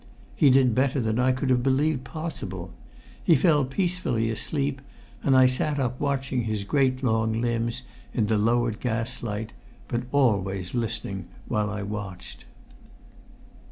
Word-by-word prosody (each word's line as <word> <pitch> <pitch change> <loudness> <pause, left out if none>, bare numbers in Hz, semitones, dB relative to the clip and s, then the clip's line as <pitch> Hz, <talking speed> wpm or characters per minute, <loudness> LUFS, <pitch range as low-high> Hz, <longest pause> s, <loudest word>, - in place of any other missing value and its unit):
He 145 - +5
did 130 -2 +5
better 135 +2 +2
than 110 -1 0
I 130 +1 +4
could 130 +1 0
have 125 -1 +3
believed 135 +1 +1
possible. 95 - -6 0.5
He 165 - +5
fell 150 0 +4
peacefully 135 - 0
asleep, 140 +3 -2 0.4
and 135 -2 +4
I 130 - +7
sat 130 +3 +1
up 125 -2 -1
watching 135 -4 -1
his 110 -2 -2
great 130 +3 +1
long 110 -2 +1
limbs 120 +1 -1 0.3
in 115 - +1
the 110 0 +1
lowered 115 0 +1
gas 115 -2 -2
light, 110 0 -4 0.3
but 120 +1 -2
always 100 -9 +1
listening 110 -6 -3 0.2
while 105 -3 0
I 100 0 -4
watched. 100 -3 -7
120 Hz, 145 wpm, -26 LUFS, 110-135 Hz, 0.5 s, I